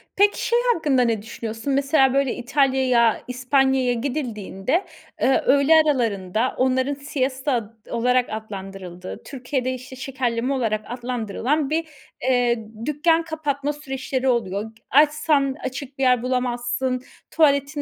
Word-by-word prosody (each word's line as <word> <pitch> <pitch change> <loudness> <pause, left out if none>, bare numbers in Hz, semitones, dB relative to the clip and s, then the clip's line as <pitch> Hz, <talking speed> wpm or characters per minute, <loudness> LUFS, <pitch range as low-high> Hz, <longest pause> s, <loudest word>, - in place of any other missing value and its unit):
Peki, 405 +1 +3
şey 475 +1 +3
hakkında 290 - +1
ne 230 -4 +1
düşünüyorsun? 225 +4 -4
Mesela 275 -1 +3
böyle 275 -2 +1
İtalya'ya, 255 -3 +2
İspanya'ya 260 0 +2
gidildiğinde, 245 - -2 0.4
ııı, 265 +1 +4
öğle 280 +3 +5
aralarında 230 - +1
onların 260 +2 +1
siesta 275 -1 -2
ad 225 -3 -2 0.2
olarak 250 +1 +2
adlandırıldığı, 195 -4 -7
Türkiye'de 260 -1 -3
işte 255 +1 -9
şekerleme 255 -1 -2
olarak 225 -5 0
adlandırılan 245 +4 -2
bir, 320 +1 -1 0.3
eee, 245 -3 +1 0.2
dükkân 325 +3 +2
kapatma 295 -3 -2
süreçleri 265 -2 -3
oluyor. 205 -5 0
G 225 - -25
açsan 295 -1 +3
açık 260 +1 -6
bir 270 - -1
yer 250 -2 +3
bulamazsın, 250 0 -1 0.3
tuvaletin 285 -1 +2
260 Hz, 120 wpm, -23 LUFS, 235-280 Hz, 0.4 s, öğle